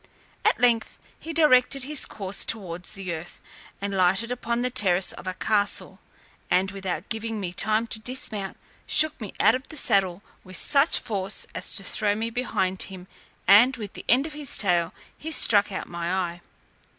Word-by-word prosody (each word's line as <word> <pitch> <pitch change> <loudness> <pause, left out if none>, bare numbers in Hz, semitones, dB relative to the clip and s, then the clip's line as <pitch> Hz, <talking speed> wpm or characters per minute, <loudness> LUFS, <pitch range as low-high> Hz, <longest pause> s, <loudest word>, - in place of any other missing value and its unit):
At - - +2
length 240 -2 +2 0.2
he 330 - -7
directed 275 -4 +3
his 295 +1 -1
course 195 -1 -2
towards 180 -5 0
the 195 -4 -5
earth, 165 +1 -8 0.4
and 200 0 -3
lighted 190 +6 +2
upon 235 -1 -2
the 250 - 0
terrace 185 -5 +3
of - - -10
a 185 - -3
castle, 205 0 -1 0.5
and, 190 +1 +2
without 190 -2 -5
giving 225 -1 -3
me 180 -3 -4
time 215 +4 +1
to 225 - -4
dismount, 220 -5 -5 0.3
shook 305 -2 +3
me 210 - -6
out 220 - +5
of 260 +2 -4
the 315 - -6
saddle 195 -5 +1 0.2
with 185 -1 -5
such 290 +2 +3
force, 195 -2 -2
as - - -1
to - - -2
throw 205 -2 +1
me 225 +2 -3
behind 200 -6 -2
him, 185 -2 -10 0.4
and 245 +6 +6
with 210 -4 -7
the - - -10
end 260 +4 +4
of 315 - -6
his 295 -3 -4
tail 175 -4 +1 0.2
he 315 - -7
struck 205 -9 +4
out 190 - -5
my 170 0 -4
eye. 175 -2 -2
210 Hz, 180 wpm, -25 LUFS, 185-245 Hz, 0.5 s, and